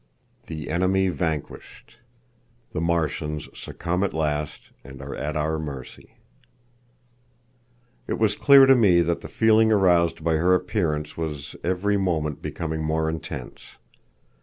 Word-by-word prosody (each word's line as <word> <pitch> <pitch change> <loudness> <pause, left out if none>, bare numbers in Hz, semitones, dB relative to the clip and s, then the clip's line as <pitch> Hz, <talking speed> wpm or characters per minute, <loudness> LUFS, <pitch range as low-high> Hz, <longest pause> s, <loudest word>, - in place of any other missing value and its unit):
The 80 -2 -6
Enemy 95 +2 +2
Vanquished. 80 +6 -5 0.7
The 80 - -2
Martians 80 -3 -1
Succumb 90 +3 -3
at 100 - -2
Last, 75 -2 -3
and 65 0 -12
Are 70 0 -7
at 75 +3 -3
Our 80 +1 -1
Mercy. 70 -5 -9 1.9
It - - -2
was 105 -2 +1
clear 140 +1 +7
to 135 - +7
me 95 -8 +5
that 85 0 -1
the - - -8
feeling 110 0 +3
aroused 90 -6 +3
by 80 -1 +2
her 90 +3 +3
appearance 75 -7 -2
was 75 -3 -5
every 95 +3 0
moment 80 -6 -1
becoming 80 -1 -4
more 80 0 0
intense. 70 -5 -8
80 Hz, 130 wpm, -24 LUFS, 75-95 Hz, 1.9 s, clear